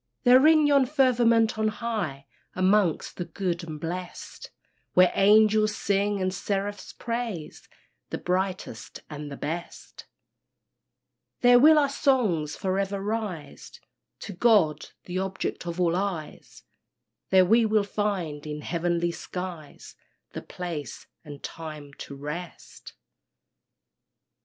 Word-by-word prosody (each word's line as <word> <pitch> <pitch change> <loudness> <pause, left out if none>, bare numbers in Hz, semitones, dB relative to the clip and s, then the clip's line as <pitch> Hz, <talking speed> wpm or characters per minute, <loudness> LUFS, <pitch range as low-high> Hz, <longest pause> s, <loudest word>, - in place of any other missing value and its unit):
There 255 +3 +7
in 310 -1 +5
yon 280 -3 +4
firmament 240 -5 +3
on 220 - +2
high, 210 -11 -3 0.3
Amongst 185 -2 +1
the 175 - -3
good 175 0 -3
and 155 -2 -7
blest, 175 +3 -7 0.5
Where 180 0 +6
angels 215 +1 +4
sing 200 0 0
and 185 0 -1
seraphs 200 +1 -3
praise 230 -9 -5 0.4
The - - -3
brightest 185 -10 -3
and 150 0 -7
the 140 - -7
best 165 +4 -7 1.3
There 245 0 +7
will 310 +4 +7
our 290 -1 +4
songs 245 - +1
for 190 0 -1
ever 195 0 -2
rise 205 -6 -5 0.4
To 200 - -7
God, 180 -7 +3 0.2
the 180 +1 -4
Object 190 -2 -4
of 170 +1 -4
all 170 -1 +2
eyes, 185 -5 -5 0.7
There 190 -1 +5
we 225 +5 +4
will 215 -1 +2
find 190 -8 -3
in 150 0 -5
heavenly 170 +1 -1
skies 175 -4 -8 0.4
The - - -6
place 165 -7 -7 0.2
and 145 -3 -11
time 155 -3 -8
to 140 - -8
rest. 150 +5 -8
185 Hz, 120 wpm, -26 LUFS, 165-215 Hz, 1.3 s, There